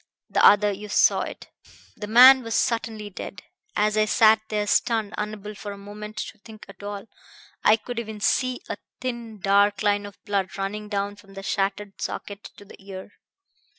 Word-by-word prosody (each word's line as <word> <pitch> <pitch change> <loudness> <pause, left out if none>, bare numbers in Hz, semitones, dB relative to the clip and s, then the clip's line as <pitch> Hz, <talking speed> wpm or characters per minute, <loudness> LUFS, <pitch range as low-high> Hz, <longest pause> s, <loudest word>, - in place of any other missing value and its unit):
The - - +2
other... 205 0 +6
you 205 +1 -7
saw - - +4
it. - - -8 0.4
The 210 - -7
man 255 +4 +9
was 230 -2 -3
certainly 220 -3 -1
dead. - - -8 0.3
As 210 0 +2
I 215 0 +3
sat 220 +1 +5
there 210 -1 -1
stunned, 220 0 +1
unable 210 0 -5
for 205 0 -7
the 200 - -8
moment 210 +2 -9
to 215 - -6
think 215 0 -13
at 195 -1 -14
all, 205 -1 -6 0.6
I 215 - +6
could 235 +2 -6
even 220 -2 -6
see 255 +4 +1
a - - -4 0.2
thin 235 -4 -5
dark 200 +1 +3
line 205 0 +1
of 200 - -13
blood 200 -2 -2
running 210 +2 -4
down 200 0 -2
from 195 -1 -17
the 195 - -7
shattered 195 0 -2
socket 200 0 -5
to 205 - -13
the 195 - -15
ear. 195 0 -9
210 Hz, 185 wpm, -24 LUFS, 200-220 Hz, 0.6 s, man